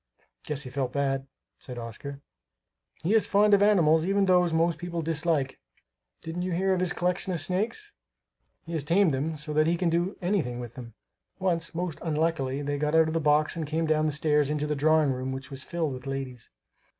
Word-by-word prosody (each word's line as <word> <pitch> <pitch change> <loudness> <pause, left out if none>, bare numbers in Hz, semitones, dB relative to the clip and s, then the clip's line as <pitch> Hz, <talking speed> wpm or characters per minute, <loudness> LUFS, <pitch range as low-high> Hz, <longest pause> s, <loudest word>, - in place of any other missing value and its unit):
'" - - -28
"Guess 150 -1 -3
he 130 - -8
felt 130 -1 -2
bad," 135 -1 -1 0.3
said 125 -2 -8
Oscar. 120 +5 -7 0.8
"He 185 +6 +1
is 225 - +3
fond 210 +1 +4
of 200 - +6
animals, 165 -6 +4
even 195 +2 +2
those 180 -2 +4
most 165 +1 +1
people 170 -1 -4
dislike. 160 -4 0 0.6
Didn't 165 +2 -4
you 180 0 -2
hear 190 +2 +2
of 185 - 0
his 180 -1 +1
collection 180 +2 -1
of 170 - -2
snakes? 220 - -2 0.7
He 170 - -7
has 160 -3 -1
tamed 170 +2 +3
them 150 +4 -1
so 150 0 -4
that 155 +1 +3
he 170 +1 +2
can 170 -1 +1
do 175 +4 0
anything 170 -10 -1
with 120 -2 -7
them. 115 -3 -10 0.4
Once, 170 -3 -1
most 175 -2 -3
unluckily, 150 -4 -1
they 145 0 -2
got 150 +1 0
out 160 0 +5
of - - -3
the 165 - +1
box 150 0 +3
and 160 -2 -3
came 160 +2 0
down 155 0 +2
stairs 150 -1 +2
into 150 0 -1
the 150 - -1
drawing 155 0 +3
room 130 0 -3
which 130 +1 -6
was 135 0 -6
filled 165 -5 -2
with 130 +1 -8
ladies." 130 -3 -5
155 Hz, 210 wpm, -27 LUFS, 140-175 Hz, 0.8 s, of